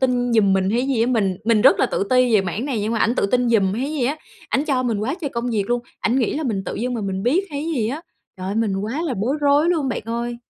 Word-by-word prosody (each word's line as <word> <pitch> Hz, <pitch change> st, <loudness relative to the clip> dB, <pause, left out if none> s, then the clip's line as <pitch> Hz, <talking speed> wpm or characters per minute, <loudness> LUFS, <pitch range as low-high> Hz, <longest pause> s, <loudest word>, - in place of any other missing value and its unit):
tin 245 Hz, -2 st, +1 dB
giùm 210 Hz, -4 st, +4 dB
mình 190 Hz, 0 st, +1 dB
hay 235 Hz, +3 st, +1 dB
cái 265 Hz, -, -2 dB
gì 260 Hz, -5 st, +1 dB
á? 235 Hz, -, +2 dB
Mình 205 Hz, -7 st, +1 dB
mình 225 Hz, -1 st, +3 dB
rất 265 Hz, -, +6 dB
là -, -, +4 dB
tự -, -, -1 dB
ti 255 Hz, -2 st, +4 dB
về 210 Hz, -, +6 dB
mảng 190 Hz, +5 st, -3 dB
này 260 Hz, -7 st, -2 dB
nhưng 215 Hz, +2 st, -1 dB
mà 230 Hz, -, 0 dB
ảnh 230 Hz, +2 st, +2 dB
tự -, -, +1 dB
tin 245 Hz, +3 st, +1 dB
giùm 200 Hz, -5 st, +3 dB
hay 260 Hz, +8 st, -2 dB
gì 285 Hz, -5 st, -1 dB
á? 280 Hz, +5 st, 0 dB, 0.3 s
Ảnh 275 Hz, -, 0 dB
cho 270 Hz, -5 st, 0 dB
mình 235 Hz, -4 st, -1 dB
quá 225 Hz, +8 st, -1 dB
trời 285 Hz, -5 st, -3 dB
công 235 Hz, +1 st, -3 dB
việc 210 Hz, -4 st, 0 dB
luôn. 240 Hz, 0 st, +1 dB, 0.2 s
Ảnh 245 Hz, +4 st, +1 dB
nghĩ 235 Hz, -, 0 dB
là 315 Hz, -, -2 dB
mình 210 Hz, -9 st, -2 dB
tự -, -, -4 dB
dưng 245 Hz, +2 st, -2 dB
mà 235 Hz, -, -3 dB
mình 195 Hz, -1 st, -3 dB
biết 300 Hz, -, +2 dB
hay 285 Hz, -1 st, -4 dB
cái 245 Hz, -, 0 dB
gì 215 Hz, -, 0 dB
á? 280 Hz, +6 st, -4 dB, 0.4 s
Trời 185 Hz, 0 st, -6 dB
ơi, 195 Hz, -, -2 dB
mình 215 Hz, -3 st, 0 dB
quá 220 Hz, +11 st, -3 dB
là 310 Hz, -7 st, -2 dB
bối 235 Hz, +9 st, 0 dB
rối 290 Hz, +3 st, +3 dB
luôn 315 Hz, -6 st, +1 dB
bạn 245 Hz, -, -3 dB
ơi! 235 Hz, +1 st, -3 dB
240 Hz, 320 wpm, -21 LUFS, 210-265 Hz, 0.4 s, rất